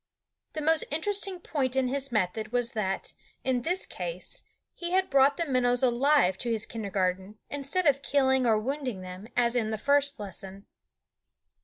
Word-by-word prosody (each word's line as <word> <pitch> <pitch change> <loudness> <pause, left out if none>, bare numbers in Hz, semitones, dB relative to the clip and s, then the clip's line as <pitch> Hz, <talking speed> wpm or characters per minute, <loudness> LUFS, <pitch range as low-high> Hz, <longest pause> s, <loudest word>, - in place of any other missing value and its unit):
The 310 - -3
most 320 +1 +4
interesting 385 +4 0
point 270 -6 -2
in 265 -1 +2
his 275 +1 -1
method 215 +1 -1
was 245 -1 +1
that, 195 -4 -2 0.3
in 255 -2 +1
this 360 +8 +1
case, - - -5 0.3
he 345 - -5
had 380 0 +2
brought 275 +1 +5
the 340 - 0
minnows 250 -3 +2
alive 250 -5 +3
to 240 - -1
his 220 -2 0
kindergarten, 195 -2 -2
instead 285 +6 -1
of 280 -2 +3
killing 265 -2 +2
or 220 -2 +4
wounding 255 -2 -3
them, 185 +3 -8
as 240 0 +3
in 225 -3 +1
the 220 - -2
first 280 +3 +2
lesson. 195 0 -8
255 Hz, 165 wpm, -28 LUFS, 215-285 Hz, 0.3 s, brought